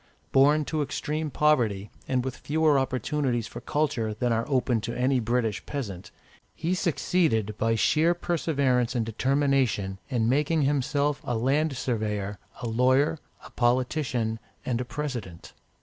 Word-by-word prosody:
Born 145 +3 +4
to 155 +1 -1
extreme 150 +2 -2
poverty, 115 -10 +1 0.2
and 130 -1 0
with 130 -2 -3
fewer 155 -1 +2
opportunities 130 -1 -1
for - - -8
culture 130 -8 -1
than 120 +2 0
are 115 +4 -1
open 125 -4 +1
to 120 +2 -4
any 130 +1 +2
British 115 -2 -1
peasant, 105 -11 -5 0.5
he 170 +3 -1
succeeded, 160 - +1
by 115 0 +2
sheer 160 +9 +3
perseverance 140 -8 0
and 115 -2 +1
determination, 130 -5 +1
in 115 -3 +1
making 150 +4 +2
himself 140 +1 +1
a 120 - -1
land 135 +4 +1
surveyor, 105 -5 -2 0.2
a - - -1
lawyer, 130 +7 +2 0.3
a - - -12
politician, 125 -2 0 0.3
and 125 -1 -1
a - - -3
President. 120 - -6
130 Hz, 140 wpm, -27 LUFS, 115-150 Hz, 0.5 s, Born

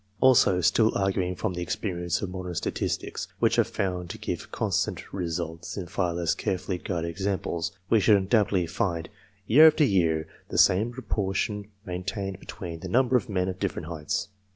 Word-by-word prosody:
Also 115 -8 +5
still 105 +6 +4
arguing 95 -2 0
from 90 - -2
the 90 - -4
experience 85 -1 -2
of 95 - -3
modern 90 -1 -5
statistics, - - -2
which - - +2
are - - +7
found 90 -2 -3
to - - -6
give - - -5
constant - - -1
results 85 -1 -4
in 95 - -3
far 90 -1 -1
less 85 -2 +1
carefully 95 -1 -2
guarded 85 -3 -3
examples 95 -2 -2 0.2
we 110 - +4
should 105 0 +5
undoubtedly 100 -2 +2
find, 85 -1 -2 0.4
year 150 +10 +8
after 155 0 +4
year, 85 - +2 0.2
the - - -3
same 105 +6 +4
proportion 105 -3 -2 0.2
maintained 95 +1 -4
between 85 -3 -7
the 90 - -7
number 125 +4 +3
of 120 - +1
men 90 -2 0
of 95 0 -4
different 90 -5 -3
heights. 80 +1 -3
95 Hz, 170 wpm, -27 LUFS, 85-100 Hz, 0.4 s, year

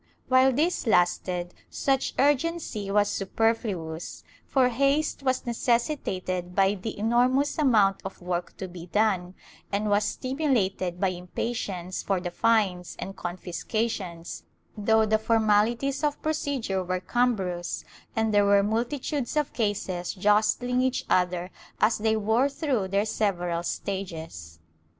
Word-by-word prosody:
While 260 +1 +5
this 300 +1 0
lasted 180 -2 +1 0.2
such 270 -1 0
urgency 290 -7 +1
was 205 +1 +3
superfluous, 200 -5 -2 0.2
for 260 -2 +3
haste 275 +6 +1
was 260 -1 0
necessitated 230 - -1
by 195 0 +4
the 205 +2 -6
enormous 250 +7 +2
amount 215 -9 +4
of 190 - -7
work 175 0 -4
to 190 - -5
be 175 -1 -10
done, 190 -3 +1 0.4
and 205 +1 0
was 205 +1 +3
stimulated 210 - -1
by 195 - +2
impatience 185 0 -4
for 195 -2 0
the 175 0 -4
fines 195 -4 +1
and 195 - -6
confiscations, 180 0 -4 0.3
though 220 +1 +3
the 215 0 +2
formal 215 -2 +3
ities 270 +5 -3
of 295 -1 0
procedure 280 -11 -1
were 185 0 -2
cumbrous 185 -5 -1 0.3
and 220 -1 +1
there 205 0 +5
were 200 0 +5
multitudes 245 +6 -2
of 300 -2 0
cases 200 -5 -2
jostling 215 +5 +2
each 260 0 0
other 180 0 +1 0.3
as 215 +1 +3
they 220 +1 +2
wore 220 +6 +2
through 270 - -1
their 200 +2 +1
several 180 -6 -1
stages. 165 - -5
210 Hz, 130 wpm, -27 LUFS, 185-245 Hz, 0.4 s, While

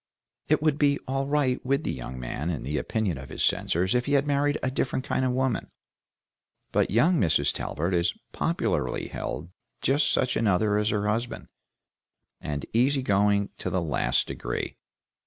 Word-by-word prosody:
It 155 0 +2
would 155 -2 +2
be 140 -1 +4
all 135 +1 -1
right 140 -3 +1
with 140 +4 +1
the - - -1
young 65 0 -6
man 70 +6 -3
in 80 -8 -3
the 75 +3 -1
opinion 100 -10 -1
of 65 - -9
his - - -3
censors 90 +3 +1
if 125 0 +1
he 140 - +1
had 140 0 +4
married 145 0 +1
a 130 - +1
different 130 0 -1
kind - - 0
of 130 - +2
woman, 130 -1 0 1.0
but - - +2
young 160 - +4
Mrs. 80 - +2
Talbert 85 +5 -2
is 85 -1 +2 0.2
popularly - - -1
held 85 +4 -5 0.3
just 140 +2 +3
such 125 - +1
another 105 -1 +2
as 105 +1 +1
her 105 -1 0
husband, 115 +3 -2 0.9
and 75 -1 -4
easy 130 +4 +3
going 100 -2 +2
to - - -2
the 95 - 0
last 80 -4 +1
degree. - - -4
115 Hz, 175 wpm, -27 LUFS, 90-135 Hz, 1.0 s, be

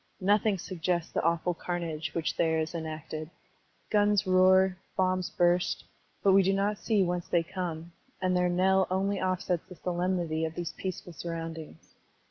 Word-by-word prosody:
Nothing 205 +1 +3
suggests 175 -1 -2
the - - 0
awful 170 +2 +1
carnage 165 -2 -4
which 165 -2 -1
there 160 -1 +2
is 160 +1 -2
enacted. 155 -1 -5 0.6
Gtms 205 0 +3
roar, 185 0 +5 0.2
bombs 185 -1 +1
burst, 175 0 +1 0.4
but 195 - +5
we 195 +1 +7
do 195 +1 +2
not 200 +1 0
see 215 -4 +2
whence 175 -1 -2
they 170 -1 +2
come, 170 -1 -5 0.3
and 185 -1 +1
their 180 0 +2
knell 190 +2 +3
only 195 +1 0
offsets 185 -2 -1
the 180 - -9
solemnity 175 -2 -1
of 160 0 -3
these 175 -2 -3
peaceful 185 -2 -6
surrotmdings. 165 - -7
180 Hz, 155 wpm, -29 LUFS, 165-190 Hz, 0.6 s, we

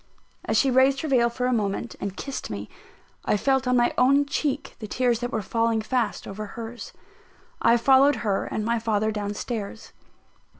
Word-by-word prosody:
As - - +1
she 270 - +3
raised 265 +2 +4
her 315 - -3
veil 245 -4 +3
for 250 +1 -3
a 255 - +1
moment, 215 +1 -2
and 200 +1 -4
kissed 275 -1 -5
me, 100 0 -6 0.5
I - - +1
felt 265 +3 +1
on 250 0 +3
my 240 0 +2
own 275 +3 +4
cheek 280 0 -2
the 215 - -6
tears 245 +1 +1
that 245 0 -3
were 220 - -2
falling 230 +1 0
fast 240 -2 -1
over 210 +2 -6
hers. 230 +3 -8 0.7
I 235 - +5
followed 270 +3 +5
her 200 -2 0
and 215 - -3
my 235 0 +1
father 220 -1 0
down 205 -1 -3
stairs. 220 -1 -5
235 Hz, 185 wpm, -25 LUFS, 215-260 Hz, 0.7 s, I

